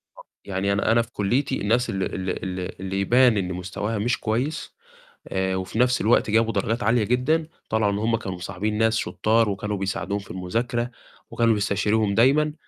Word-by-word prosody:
بالضبط. - - -15 0.2
يعني 100 0 -1
أنا 100 +2 +1
أنا 115 +1 +4
في 115 0 -8
كُلّيتي 125 +7 0
الناس 115 +4 +1
ال 95 -3 -1
ال 95 0 -3
اللي 90 -1 -4
اللي 95 +1 -3
يبان 120 +2 +4
إن 90 -1 -1
مستواها 95 +5 -3
مش 120 +4 0
كويس 125 +9 -2 0.5
آآ 95 0 -1
وفي 95 +4 -4
نَفْس 125 0 +3
الوقت 110 0 +3
جابوا 115 +1 +2
درجات 115 +4 -1
عالية 115 0 +3
جدًا، 135 +8 +1 0.2
طلع 110 -2 +2
إن 100 - -1
هم 115 +2 +1
كانوا 95 -4 -5
مصاحبين 105 +4 -3
ناس 110 0 +2
شطّار 110 0 +1
وكانوا 100 +1 -3
بيساعدوهم 100 +1 -2
في 100 -3 -11
المذاكرة 115 +7 -2 0.4
وكانوا 115 -1 +3
بيستشيروهم 105 +1 +1
دايمًا، 145 +6 +4
110 Hz, 180 wpm, -24 LUFS, 100-120 Hz, 0.5 s, أنا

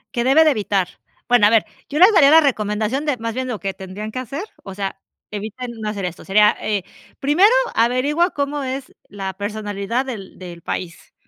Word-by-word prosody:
Que 235 - +1
debe 295 +5 +5
de 310 - +5
evitar. 200 -6 0 0.4
Bueno, 245 -4 +5
a - - +4
ver, 225 -2 +4 0.2
yo 300 +3 -2
les 385 +5 +8
daría 290 -6 +6
la 320 - +9
recomendación 220 -1 0
de 290 -4 0
más 230 -1 -4
bien 260 0 -3
lo 220 - -3
que 195 -1 -3
tendrían 195 +3 -7
que 255 - -3
hacer 275 - -5 0.2
o 195 - -8
sea, 195 -1 -4 0.3
eviten 220 +4 -6
no 215 - -2
hacer 200 -3 -4
esto, 180 -1 -6
sería, 210 +2 +4
eh, 205 -4 -1 0.4
primero 325 +10 +4 0.2
averigua 265 +9 +2
cómo 285 0 -2
es 265 0 -5
la 195 -2 -5
personalidad 205 +4 -3
del 215 -8 -8
del 175 -2 -9
país 170 +1 -6
225 Hz, 195 wpm, -20 LUFS, 200-275 Hz, 0.4 s, la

